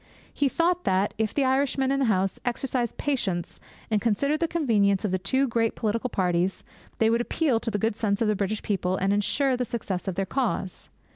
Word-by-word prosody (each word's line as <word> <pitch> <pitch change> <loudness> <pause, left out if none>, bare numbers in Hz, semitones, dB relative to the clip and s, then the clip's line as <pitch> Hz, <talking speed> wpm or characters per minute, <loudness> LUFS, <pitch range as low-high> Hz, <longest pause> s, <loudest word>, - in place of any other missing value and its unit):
He 285 -1 +1
thought 350 +4 +1
that, 190 +2 +1
if 220 -1 +1
the 280 - +1
Irishmen 265 0 +1
in 275 - +1
the 270 - +2
House 195 -4 +1
exercised 245 -1 -2
patience, 195 -12 -2 0.3
and 210 -2 +2
considered 280 +7 +1
the 335 - +1
convenience 215 - +2
of 200 - -1
the 185 - 0
two 260 +9 +1
great 230 -1 0
political 230 +3 -1
parties, 180 -2 0 0.3
they 225 0 +3
would 230 +1 +2
appeal 255 -1 +1
to 230 - -3
the 210 - -1
good 220 +1 0
sense 205 -2 0
of 225 - +1
the 215 - +2
British 205 +2 -2
people 185 -3 0
and 195 +1 +1
ensure 260 +6 +1
the 250 - -1
success 210 -6 -4
of 190 - -2
their 195 - -1
cause. 225 -5 -2
225 Hz, 210 wpm, -26 LUFS, 195-265 Hz, 0.3 s, they